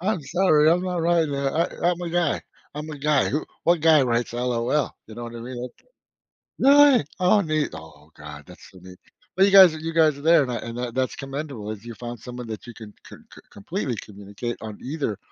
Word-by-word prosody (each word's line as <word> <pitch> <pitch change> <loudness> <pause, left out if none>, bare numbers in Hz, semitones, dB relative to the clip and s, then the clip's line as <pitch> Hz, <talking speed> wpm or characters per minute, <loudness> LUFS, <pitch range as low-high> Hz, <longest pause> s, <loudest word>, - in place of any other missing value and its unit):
I'm 185 -3 -1
sorry, 160 -1 +3
I'm 180 +2 +2
not 180 -2 -2
writing 165 -3 +2
that. 140 -1 -1 0.3
I 175 - +3
I'm 175 - -4
a 175 - -4
guy. 175 -3 0 0.3
I'm 150 +1 -6
a 145 - -8
guy. 150 -1 +2
Who 150 - -2 0.2
what 170 -1 +3
guy 160 -3 +6
writes 120 -1 -1
LOL 125 +3 -1
you 110 - -12
know 120 0 -7
what 120 0 -9
I - - -8
mean? 125 +1 -7
Ok 125 - -13 0.8
Really? 280 - +6 0.2
Oh 185 +3 +4
neat. 155 -3 -1
Oh 75 -1 -13
God, 75 -1 -11
that's 90 - -15
so 95 - -16
neat. 90 0 -14 0.4
But 190 - +6
you 200 - +2
guys 190 -4 +9
you 160 +1 -5
guys 155 -3 +3
are - - -11
there 165 -1 +5
and 125 - -4
I - - -2
and 115 +1 -7
that, 125 -1 -4
that's 130 -1 -1
commendable 135 -6 -6
if 110 +1 -9
you 120 - -7
found 120 -1 -8
someone 125 0 -8
that 110 +2 -8
you 120 - -9
can 110 -2 -12
c - - -11 0.2
c - - -13
completely 130 - -4
communicate 105 +3 -7
on 110 -2 -7
either 135 -7 -3
135 Hz, 225 wpm, -23 LUFS, 115-165 Hz, 0.8 s, guys